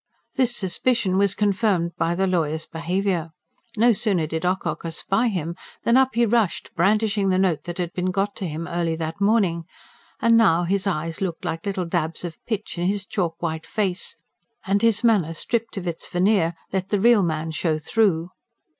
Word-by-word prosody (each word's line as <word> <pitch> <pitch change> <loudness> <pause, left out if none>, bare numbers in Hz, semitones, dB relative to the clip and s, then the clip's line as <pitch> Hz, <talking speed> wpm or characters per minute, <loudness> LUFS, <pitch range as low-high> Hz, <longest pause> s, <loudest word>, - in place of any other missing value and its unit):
This 250 -3 +1
suspicion 195 -1 0
was 200 -1 +2
confirmed 200 -4 +1
by 165 +1 0
the 190 +2 +1
lawyer's 160 -4 0
behaviour. 175 0 -1 0.5
No 235 +3 +5
sooner 195 -6 +1
did 160 +3 -2
Ocock 185 +1 -1
espy 195 +7 0
him 170 -4 -3 0.3
than 235 - +3
up 260 -2 +4
he 235 0 +4
rushed, 225 -4 0
brandishing 205 +2 +2
the 185 - +2
note 185 -5 +1
that 175 -1 -5
had 175 -2 -3
been 180 0 -1
got 195 +2 -1
to 190 - -3
him 160 +1 -4
early 170 -2 -1
that 160 +3 -5
morning 200 -6 +2 0.5
and 230 -3 +4
now 190 -7 +4
his 195 +3 0
eyes 165 -2 -2
looked 180 -4 -3
like 165 +4 -3
little 190 -2 -1
dabs 165 0 -2
of 165 -2 -8
pitch 215 -5 -3
in 175 - +1
his 200 0 -1
chalk 175 -6 -2
white 160 -1 -3
face, 195 -4 -1 0.5
and 200 0 +1
his 230 0 +3
manner, 195 -9 +3
stripped 230 +5 -2
of 190 - -4
its 165 -1 -4
veneer, 180 -2 +2 0.2
let 190 0 -1
the 205 - +1
real 230 0 +5
man 160 -2 -1
show 155 0 0
through. 175 0 +1
185 Hz, 185 wpm, -23 LUFS, 165-210 Hz, 0.5 s, No